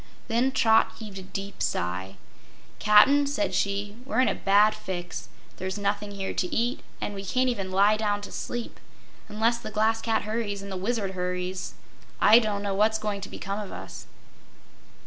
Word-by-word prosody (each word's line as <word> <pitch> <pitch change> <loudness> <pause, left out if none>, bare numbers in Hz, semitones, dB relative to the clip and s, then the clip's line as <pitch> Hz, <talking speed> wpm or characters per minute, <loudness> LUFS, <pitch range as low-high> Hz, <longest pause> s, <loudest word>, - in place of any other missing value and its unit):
Then 240 +4 +2
Trot 225 -4 +4
heaved 210 -4 -8
a - - -7
deep 195 +2 -7
sigh. 95 +2 -2 0.6
"Cap'n," 270 +8 +6
said 290 +2 -1
she, 200 +1 -1
"we're 265 - -1
in 255 - +5
a - - +1
bad 205 +2 +4
fix. 180 -4 -6 0.3
There's 190 +2 -4
nothing 205 0 -1
here 195 -1 -3
to 180 - -2
eat, 240 +6 0 0.2
and 205 - -3
we 195 -1 -6
can't 255 +6 +1
even 195 -6 -2
lie 200 +3 +4
down 205 -1 0
to 205 - -8
sleep. 240 -1 -5 0.5
Unless 225 +3 +1
the - - -7
Glass 220 +1 +1
Cat 225 -1 0
hurries, 215 -2 -3
and 200 - -7
the - - -3
Wizard 200 +1 -1
hurries, 180 0 -3 0.4
I 220 +3 +8
don't 210 -3 -2
know 200 -1 -1
what's 215 +3 +3
going 210 -2 -3
to 195 - -6
become 200 +1 -4
of 205 -2 -6
us!" - - -8
205 Hz, 180 wpm, -27 LUFS, 195-225 Hz, 0.6 s, I